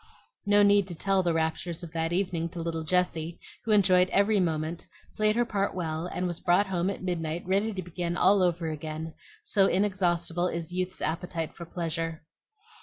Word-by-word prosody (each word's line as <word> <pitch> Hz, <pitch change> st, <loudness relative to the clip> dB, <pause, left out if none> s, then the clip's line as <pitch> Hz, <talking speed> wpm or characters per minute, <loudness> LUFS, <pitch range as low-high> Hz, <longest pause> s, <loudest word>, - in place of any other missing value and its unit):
No 205 Hz, 0 st, +5 dB
need 200 Hz, -1 st, +4 dB
to 175 Hz, -, -5 dB
tell 195 Hz, +3 st, +1 dB
the 175 Hz, -2 st, +1 dB
raptures 165 Hz, +2 st, -2 dB
of 165 Hz, -, -8 dB
that 165 Hz, 0 st, -1 dB
evening 175 Hz, -2 st, -1 dB
to 170 Hz, -, -8 dB
little 165 Hz, -1 st, -2 dB
Jessie, 170 Hz, -1 st, 0 dB, 0.3 s
who 225 Hz, -, 0 dB
enjoyed 185 Hz, -3 st, +5 dB
every 200 Hz, +1 st, +3 dB
moment, 160 Hz, -1 st, -2 dB, 0.3 s
played 215 Hz, 0 st, +2 dB
her 240 Hz, 0 st, +2 dB
part 200 Hz, -4 st, -1 dB
well, 165 Hz, -1 st, -3 dB
and 180 Hz, 0 st, -3 dB
was 175 Hz, -1 st, -2 dB
brought 180 Hz, +3 st, +3 dB
home 185 Hz, -1 st, -1 dB
at 200 Hz, -, -5 dB
midnight 170 Hz, -2 st, -2 dB
ready 200 Hz, +4 st, +1 dB
to 190 Hz, -3 st, -5 dB
begin 175 Hz, 0 st, -3 dB
all 195 Hz, +2 st, +5 dB
over 175 Hz, -2 st, +1 dB
again, 155 Hz, +1 st, -5 dB, 0.3 s
so 195 Hz, -2 st, +3 dB
inexhaustible 180 Hz, -3 st, +1 dB
is 170 Hz, -1 st, -4 dB
youth's 185 Hz, 0 st, -2 dB
appetite 165 Hz, 0 st, -2 dB
for 170 Hz, -, -8 dB
pleasure. 165 Hz, -1 st, -4 dB
175 Hz, 180 wpm, -28 LUFS, 165-190 Hz, 0.3 s, No